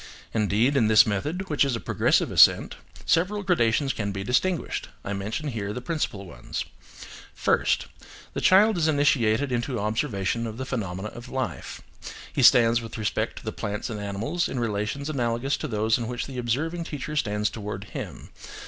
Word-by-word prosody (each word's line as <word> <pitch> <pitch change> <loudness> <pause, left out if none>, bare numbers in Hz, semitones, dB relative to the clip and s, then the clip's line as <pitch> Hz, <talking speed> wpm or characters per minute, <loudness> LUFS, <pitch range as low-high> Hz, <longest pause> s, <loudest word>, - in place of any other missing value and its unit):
Indeed, 110 +5 +2
in 120 -6 +4
this 110 -1 +7
method, 150 - -2
which 150 -4 +2
is 135 -3 0
a - - -3
progressive - - +1
ascent, - - +5 0.3
several 200 +5 +1
gradations 135 - +2
can 100 -2 -3
be 100 0 -4
distinguished: 160 - 0 0.2
I 100 - -2
mention 105 +10 -3
here 105 -5 -4
the 125 - -4
principal 125 -8 -3
ones: 90 - -6 0.7
First. - - +1 0.5
The - - -3
child 200 +1 +5
is 160 - +2
initiated 140 -4 +2
into 120 0 -1
observation 110 +1 -1
of 110 0 -7
the 130 - -4
phenomena 105 -6 -4
of 120 +3 -11
life. 120 - -4 0.5
He - - 0
stands 115 0 +6
with 115 -1 -8
respect 105 -2 -2
to - - -10
the - - -2
plants 105 +4 -4
and 105 - -4
animals 105 - -2
in 130 - -3
relations 115 +5 -2
analogous 125 -2 0
to 155 - -4
those 110 -1 +1
in 115 - -3
which 120 0 -3
the 130 -2 -6
observing 160 +9 -1
teacher 150 0 -5
stands 105 -6 0
towards 105 -2 -6
him. - - -7
120 Hz, 175 wpm, -26 LUFS, 105-145 Hz, 0.7 s, this